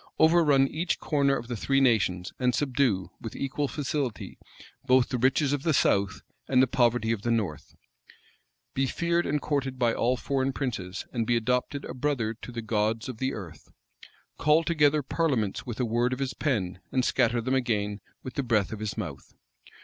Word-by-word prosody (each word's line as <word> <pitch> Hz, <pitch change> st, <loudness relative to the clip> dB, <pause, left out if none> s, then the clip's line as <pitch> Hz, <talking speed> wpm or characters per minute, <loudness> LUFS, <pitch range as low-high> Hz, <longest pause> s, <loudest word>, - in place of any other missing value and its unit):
Overrun 160 Hz, -4 st, +5 dB
each 165 Hz, +5 st, -1 dB
corner 140 Hz, -3 st, +1 dB
of 115 Hz, -, -7 dB
the 120 Hz, -, -3 dB
three 135 Hz, +5 st, +1 dB
nations, 95 Hz, -8 st, +2 dB
and 125 Hz, -2 st, +2 dB
subdue, 120 Hz, -, 0 dB
with 115 Hz, -, -7 dB
equal 140 Hz, +1 st, -2 dB
facility, 140 Hz, -4 st, -3 dB, 0.4 s
both 130 Hz, -2 st, +4 dB
the 125 Hz, -, -2 dB
riches 135 Hz, +3 st, +2 dB
of 145 Hz, -, -1 dB
the 155 Hz, -1 st, +1 dB
south 100 Hz, -6 st, +2 dB, 0.3 s
and 130 Hz, -, +3 dB
the 130 Hz, -, +7 dB
poverty 120 Hz, -3 st, +2 dB
of 115 Hz, -3 st, -1 dB
the 120 Hz, -, -2 dB
north? 105 Hz, -10 st, -2 dB, 1.0 s
Be 135 Hz, 0 st, +1 dB
feared 170 Hz, +3 st, 0 dB
and 150 Hz, +1 st, +1 dB
courted 135 Hz, -3 st, -2 dB
by 120 Hz, -2 st, +2 dB
all 125 Hz, +2 st, +1 dB
foreign 135 Hz, +1 st, -1 dB
princes, 105 Hz, -9 st, -4 dB
and 115 Hz, -3 st, -1 dB
be 120 Hz, -, +3 dB
adopted 125 Hz, +4 st, -1 dB
a -, -, -6 dB
brother 125 Hz, -5 st, -1 dB
to 120 Hz, +2 st, -10 dB
the 115 Hz, -1 st, -5 dB
gods 110 Hz, +3 st, 0 dB
of 120 Hz, -4 st, -7 dB
the 130 Hz, 0 st, -1 dB
earth? 85 Hz, -7 st, -10 dB, 0.7 s
Call 155 Hz, +2 st, +4 dB
together 150 Hz, -3 st, +3 dB
parliaments 130 Hz, -, -1 dB
with 120 Hz, 0 st, -5 dB
a 125 Hz, -, +1 dB
word 120 Hz, +2 st, +1 dB
of -, -, -3 dB
his 135 Hz, -1 st, -2 dB
pen, 95 Hz, -, -1 dB
and 130 Hz, -1 st, +1 dB
scatter 120 Hz, -2 st, +2 dB
them 130 Hz, +3 st, -1 dB
again 105 Hz, -5 st, 0 dB, 0.2 s
with 130 Hz, -, -6 dB
the -, -, -1 dB
breath 115 Hz, -6 st, +1 dB
of 110 Hz, -, -6 dB
his 110 Hz, -1 st, -4 dB
mouth? -, -, -7 dB
125 Hz, 190 wpm, -27 LUFS, 110-140 Hz, 1.0 s, the